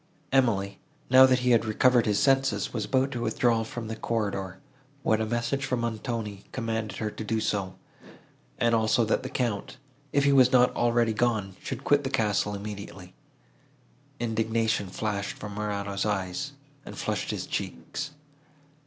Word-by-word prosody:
Emily, 100 -7 +2 0.3
now 130 0 +9
that 130 -1 +3
he 125 0 +2
had 115 -1 +5
recovered 120 +2 +3
his 105 -1 +2
senses, 135 +2 +2
was 110 -4 -2
about 135 +1 +1
to 120 -3 -4
withdraw 120 -1 +2
from 115 0 -6
the 110 - -4
corridor, 100 -5 -2 0.5
when 110 0 +2
a 110 - -1
message 120 +4 -1
from 125 -2 -1
Montoni 110 -3 -4
commanded 115 -3 -3
her 110 -1 -2
to 110 - -6
do 110 +1 -1
so, 95 -3 -1 0.8
and 115 0 +2
also 110 +1 +3
that 110 - +1
the 130 - -5
Count, 120 -6 -2 0.3
if 140 - +2
he 140 0 +4
was 130 -2 +6
not 125 0 +4
already 120 -1 +2
gone, 105 -4 0
should - - -5
quit 145 0 +3
the 135 - -2
castle 105 -5 +1
immediately. 100 -3 -8 1.1
Indignation 110 -2 0
flashed 100 +1 -3
from 105 -1 -7
Morano's 100 -1 -2
eyes, 100 +7 -2 0.3
and - - -10
flushed - - -2
his - - -3
cheeks. 145 +1 -4
110 Hz, 160 wpm, -27 LUFS, 105-125 Hz, 1.1 s, now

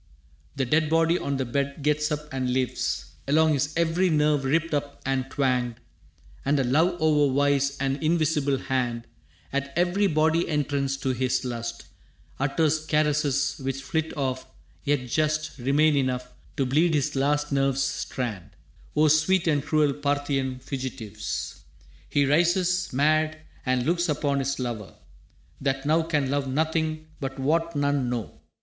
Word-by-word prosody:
The 135 - 0
dead 155 +4 +2
body 165 +2 +3
on 140 -1 -2
the 130 - -1
bed 140 +3 -2
gets 150 +1 +1
up 150 0 -3
and 130 -1 -1
lives 130 -1 -1 0.2
Along 155 +2 +4
his 145 +1 0
every 170 +2 +2
nerve 150 -3 +2
ripped 160 +4 +1
up 145 -1 -2
and 135 -1 -1
twanged, 125 -4 0 0.7
And 140 +1 +2
a - - +2
love 160 +8 +2
o'er 150 -3 +3
wise 140 0 +2
and 135 +1 -1
invisible 155 -3 +1
hand 125 -3 -2 0.5
At 140 0 -1
every 180 +4 +2
body 160 +1 +2
entrance 140 -2 0
to 135 - -1
his 130 0 0
lust 115 -1 -5 0.5
Utters 155 +3 +1
caresses 150 -3 +1
which 135 0 -3
flit 160 -1 -2
off, 130 -2 -2 0.4
yet 145 -3 0
just 155 +1 -1
Remain 145 +4 +3
enough 125 -2 -1 0.2
to 135 - +1
bleed 155 +6 +2
his 145 0 0
last 145 +2 +1
nerve's 135 -1 +2
strand, 115 - -3 0.5
O 155 +1 +4
sweet 155 +4 +3
and 145 -3 +2
cruel 150 -1 +2
Parthian 140 -2 -1
fugitives! 120 -6 -5 0.5
He 145 -1 +2
rises, 175 +4 +2
mad, 155 +3 +2 0.3
and 130 -1 +1
looks 170 +2 +1
upon 145 -2 0
his 140 +1 -1
lover, 115 -8 -5 0.7
That 135 0 -1
now 160 +3 +3
can 150 -5 0
love 140 -1 0
nothing 155 +2 -1
but 135 -1 -4
what 165 +4 0
none 145 -3 +1
know. 120 -3 -5
145 Hz, 150 wpm, -26 LUFS, 135-155 Hz, 0.7 s, Along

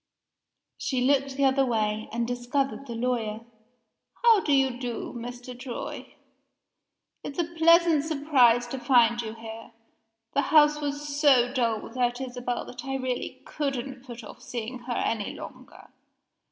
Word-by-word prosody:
She 260 - -1
looked 275 +1 +2
the 280 - +3
other 270 0 +4
way, 215 -3 -1
and 235 +1 -1
discovered 265 +3 -2
the 235 - -5
lawyer. 230 -3 -1 0.8
"How 460 -3 +7
do 315 - -2
you 265 -3 +2
do, 245 -3 -4
Mr. 245 +1 -7
Troy? 245 -1 -7 1.1
It's 280 - -7
a 345 - +2
pleasant 335 -1 +4
surprise 280 -6 +3
to 265 - -4
find 240 -1 +4
you 220 -1 -6
here 225 0 -10 0.6
The 285 - +3
house 300 +1 +4
was 290 0 -3
so 280 -4 +4
dull 230 -4 +1
without 245 0 -1
Isabel 245 -1 -4
that 245 0 -9
I 270 0 -3
really 255 -2 -4
couldn't 270 -3 -4
put 240 -2 -9
off 215 - -12
seeing 250 -2 -5
her 240 0 -5
any 220 -3 -1
longer. - - -11
250 Hz, 145 wpm, -27 LUFS, 240-280 Hz, 1.1 s, How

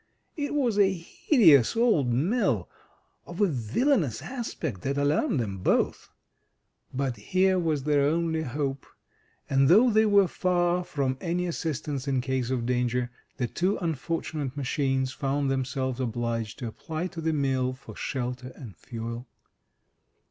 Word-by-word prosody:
It 290 -1 -3
was 240 -8 +1
a 195 -1 +5
hideous 170 - +4
old 225 - +3
mill, 140 - +1 0.6
of 175 - -8
a 205 - +5
villainous 155 - 0
aspect, 170 - -4
that 140 +1 -2
alarmed 145 - +1
them 100 -5 -3
both. - - 0 0.8
But 130 -2 -2
here 185 - +2
was 155 -5 0
their 145 -1 +3
only 160 +1 0
hope, 135 -1 -3 0.6
and 135 0 +3
though 225 +8 +6
they 220 0 +4
were 200 -2 +5
far 175 0 +1
from 135 -5 -2
any 175 +1 -1
assistance 150 -5 -3
in 135 -2 +1
case 130 -1 -1
of 125 -3 -1
danger, 125 0 0 0.3
the 125 - 0
two 180 - 0
unfortunate 155 -3 -3
machines 135 -1 0
found 140 0 -1
themselves 130 -1 -2
obliged 115 -2 -2
to 120 - -5
apply 160 +9 -5
to 175 -3 -6
the 160 0 +1
mill 135 -4 +1
for 115 -4 -12
shelter 125 0 -4
and 115 - -10
fuel. 115 +4 -6
140 Hz, 140 wpm, -27 LUFS, 125-175 Hz, 0.8 s, though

